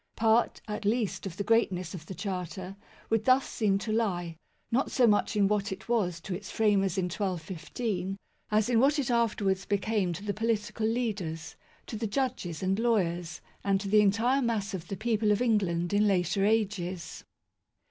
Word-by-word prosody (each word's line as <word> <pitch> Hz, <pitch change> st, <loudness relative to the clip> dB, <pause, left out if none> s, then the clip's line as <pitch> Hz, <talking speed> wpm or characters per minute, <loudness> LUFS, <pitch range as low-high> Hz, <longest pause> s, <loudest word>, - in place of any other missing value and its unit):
Part, 225 Hz, +1 st, +2 dB
at 210 Hz, 0 st, -4 dB
least, 215 Hz, -1 st, 0 dB
of 180 Hz, -1 st, -8 dB
the 205 Hz, -, -1 dB
greatness 190 Hz, -6 st, +1 dB
of 170 Hz, -3 st, -8 dB
the 190 Hz, -, -7 dB
Charter 185 Hz, 0 st, -5 dB, 0.4 s
would 225 Hz, -1 st, +2 dB
thus 260 Hz, +1 st, +4 dB
seem 205 Hz, -3 st, +1 dB
to 205 Hz, +3 st, -4 dB
lie, 180 Hz, -7 st, -1 dB, 0.4 s
not 255 Hz, +4 st, +1 dB
so 250 Hz, -, +3 dB
much 210 Hz, 0 st, +2 dB
in 200 Hz, -1 st, +4 dB
what 200 Hz, -1 st, 0 dB
it 190 Hz, -, -7 dB
was 195 Hz, -8 st, 0 dB
to 190 Hz, -, -5 dB
its 200 Hz, +3 st, -6 dB
framers 200 Hz, -4 st, +2 dB
in 190 Hz, -, +1 dB
1215, 185 Hz, +2 st, -3 dB, 0.3 s
as 215 Hz, 0 st, +2 dB
in 240 Hz, -2 st, +3 dB
what 280 Hz, +4 st, +4 dB
it 265 Hz, -4 st, 0 dB
afterwards 205 Hz, -5 st, +1 dB
became 205 Hz, -2 st, 0 dB
to 180 Hz, -, -7 dB
the 205 Hz, -1 st, -2 dB
political 220 Hz, 0 st, -1 dB
leaders, 205 Hz, -9 st, -2 dB, 0.3 s
to -, -, -6 dB
the 220 Hz, +1 st, -2 dB
judges 210 Hz, -, -2 dB
and 190 Hz, +2 st, +1 dB
lawyers, 175 Hz, -8 st, 0 dB, 0.2 s
and 195 Hz, -1 st, +2 dB
to 200 Hz, -, -5 dB
the 210 Hz, +1 st, +6 dB
entire 225 Hz, +7 st, +3 dB
mass 220 Hz, -4 st, -1 dB
of 175 Hz, -3 st, -5 dB
the 195 Hz, -, -5 dB
people 215 Hz, -2 st, +1 dB
of 205 Hz, -, +2 dB
England 190 Hz, -7 st, +1 dB
in 210 Hz, +1 st, +4 dB
later 190 Hz, 0 st, +1 dB
ages. 200 Hz, -5 st, -1 dB
205 Hz, 180 wpm, -29 LUFS, 185-225 Hz, 0.4 s, the